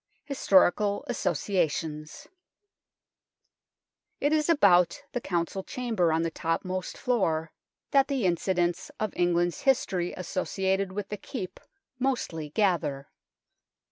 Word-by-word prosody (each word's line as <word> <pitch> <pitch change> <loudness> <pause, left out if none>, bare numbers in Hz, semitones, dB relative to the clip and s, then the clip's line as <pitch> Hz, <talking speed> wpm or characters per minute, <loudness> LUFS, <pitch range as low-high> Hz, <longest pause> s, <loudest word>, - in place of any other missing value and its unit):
HISTORICAL 205 -6 +3
ASSOCIATIONS 160 -6 -2 1.9
It 290 +2 +2
is 310 +1 +2
about 180 - +4
the 245 - -3
Council 175 0 -2
Chamber 225 - 0
on 160 +1 +1
the 165 - -1
topmost 185 +3 -3
floor 165 -10 0 0.4
that 275 -1 +4
the 270 -7 -1
incidents 175 0 0
of 215 -2 -2
England's 175 0 +1
THE - - -11
NORMAN 270 - +8
KEEP - - -7
33 180 -2 -1
history - - -9
associated 190 +1 -1
with 205 0 -4
the 210 - -4
Keep 200 -2 -6 0.4
mostly 210 - -1
gather. 150 -7 0
185 Hz, 120 wpm, -28 LUFS, 170-215 Hz, 1.9 s, NORMAN